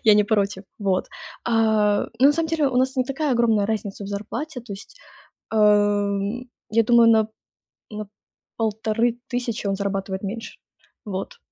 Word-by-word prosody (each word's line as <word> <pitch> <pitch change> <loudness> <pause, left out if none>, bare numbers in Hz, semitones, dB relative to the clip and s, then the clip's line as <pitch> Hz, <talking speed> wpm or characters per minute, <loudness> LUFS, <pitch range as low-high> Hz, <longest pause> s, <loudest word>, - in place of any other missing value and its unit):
я 215 - +7
не 210 0 +4
против. 200 -2 0 0.2
Вот. 195 -3 0 0.4
А, 220 -3 +3 0.2
ну, 265 - +6
на 290 - +6
самом 325 +2 0
деле 310 -4 +2
у 250 - -2
нас 260 +1 +2
не 255 - +2
такая 275 +2 -1
огромная 225 -4 +3
разница 205 -2 -3
в - - -6
зарплате. 240 +8 -5
То 230 -3 -9
есть, 200 - -11 0.5
эм, 205 +2 +2 0.2
я 230 +2 +4
думаю, 235 0 +6
на 220 -1 +4 0.6
на 210 0 -6 0.5
1500 230 +1 -1
он 195 - +1
зарабатывает 195 -1 -3
меньше. 225 +4 -6 0.5
Вот. 195 -1 -5
220 Hz, 150 wpm, -23 LUFS, 205-240 Hz, 0.6 s, я